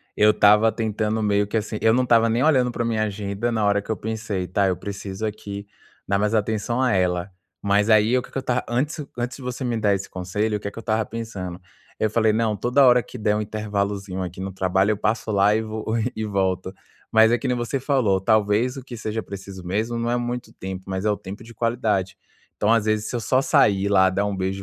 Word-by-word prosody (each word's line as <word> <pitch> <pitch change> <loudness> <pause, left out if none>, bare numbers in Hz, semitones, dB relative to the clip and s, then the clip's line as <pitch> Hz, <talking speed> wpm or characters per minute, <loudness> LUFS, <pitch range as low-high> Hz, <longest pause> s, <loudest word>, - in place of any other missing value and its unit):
eu 105 0 +5
estava 105 +2 +5
tentando 110 -1 -1
meio 105 -1 +2
que, 110 - -1
assim 110 0 -3
eu 110 0 +4
não 130 - +3
estava 115 -2 +4
nem 115 +4 +1
olhando 130 -6 +3
pra 120 0 -2
minha 110 -2 0
agenda 100 +2 -2
na 110 -2 0
hora 100 0 +2
que - - -18
eu 110 - -1
pensei: 110 -3 -3
"Tá, 100 +2 +1
eu 95 - +1
preciso 100 0 -5
aqui 100 -1 -6 0.4
dar 100 0 +1
mais 105 +1 +1
atenção 110 +3 0
a 130 - +2
ela". 90 0 0 0.3
Mas, 100 +2 +3
aí, 110 +3 +5
o - - +1
que - - -13
que - - -6
eu - - -1
estava 125 -1 -1
antes 145 +7 -1 0.2
antes 120 +1 -3
de 135 - -11
você 125 +1 -4
me 120 -2 -1
dar 105 -2 +2
esse 95 0 -3
conselho, 105 +4 -2
o - - -10
que 100 - -4
que 100 - -17
eu 115 - -5
estava 110 -1 0
pensando. 100 -6 -6 0.4
Eu 110 - +2
falei: 110 0 +2
"Não, 110 -1 +1
toda 125 +6 +3
hora 125 -1 +6
que 125 - -10
der 105 -2 +1
um 105 - 0
intervalozinho 100 -2 -3
aqui 90 0 -5
no 95 0 -4
trabalho, 95 +2 +1
eu 105 - -1
passo 110 +1 -1
lá 100 +1 +4
e 110 - +1
v 110 - -7 0.5
e 110 - -3
volto". 95 -2 -1 0.4
Mas 110 +1 +6
é 120 - +3
que 135 - -4
nem 125 - +1
você 120 +3 -2
falou, 125 -8 +2
talvez 110 +5 +2
o 135 - -8
que 125 -2 -9
seja 110 0 -3
preciso 100 -2 -9
mesmo 110 +6 -1
não 115 - -1
é 120 - +1
muito 120 0 -4
tempo, 95 0 -7
mas 95 +2 -3
é 105 - +3
o - - +1
tempo 100 +2 -9
de 115 - -13
qualidade. 110 -5 -1 0.4
Então, 110 +2 +3
às 110 -2 +2
vezes, 110 0 0
se - - -4
eu - - 0
só 130 +4 +2
sair 105 - +3
lá 95 -2 +5
dar 100 +2 0
um 100 -1 -2
beijo 95 +1 -2
105 Hz, 245 wpm, -23 LUFS, 100-115 Hz, 0.5 s, hora